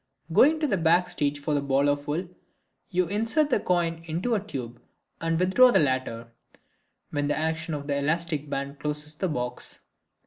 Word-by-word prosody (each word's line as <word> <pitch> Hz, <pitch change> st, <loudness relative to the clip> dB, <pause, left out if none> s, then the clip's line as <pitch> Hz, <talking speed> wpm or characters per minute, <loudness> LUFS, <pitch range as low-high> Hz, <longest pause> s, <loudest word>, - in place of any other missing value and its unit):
Going 310 Hz, -, +5 dB
to 310 Hz, -, +1 dB
the 235 Hz, -9 st, +1 dB
back 170 Hz, +1 st, +4 dB
of -, -, -12 dB
the -, -, -11 dB
stage 145 Hz, 0 st, -1 dB
for 150 Hz, +1 st, -2 dB
the 145 Hz, -, +1 dB
ball 140 Hz, 0 st, +2 dB
of 145 Hz, 0 st, 0 dB
wool, 165 Hz, +5 st, -2 dB, 0.6 s
you 180 Hz, 0 st, +1 dB
insert 230 Hz, -, 0 dB
the 245 Hz, -, +3 dB
coin 170 Hz, -3 st, 0 dB
into 170 Hz, +9 st, -2 dB
the 220 Hz, -, +3 dB
tube 125 Hz, -, -7 dB, 0.4 s
and 165 Hz, 0 st, 0 dB
withdraw 190 Hz, +8 st, +6 dB
the -, -, +4 dB
latter, 130 Hz, -5 st, -1 dB, 0.8 s
when 145 Hz, -1 st, -1 dB
the 145 Hz, -, 0 dB
action 160 Hz, 0 st, -2 dB
of 145 Hz, -1 st, -6 dB
the 140 Hz, -1 st, -1 dB
elastic 150 Hz, 0 st, -1 dB
band 140 Hz, 0 st, -4 dB
closes 150 Hz, 0 st, -4 dB
the 185 Hz, +5 st, -2 dB
box. 125 Hz, -6 st, -5 dB
155 Hz, 195 wpm, -26 LUFS, 145-180 Hz, 0.8 s, withdraw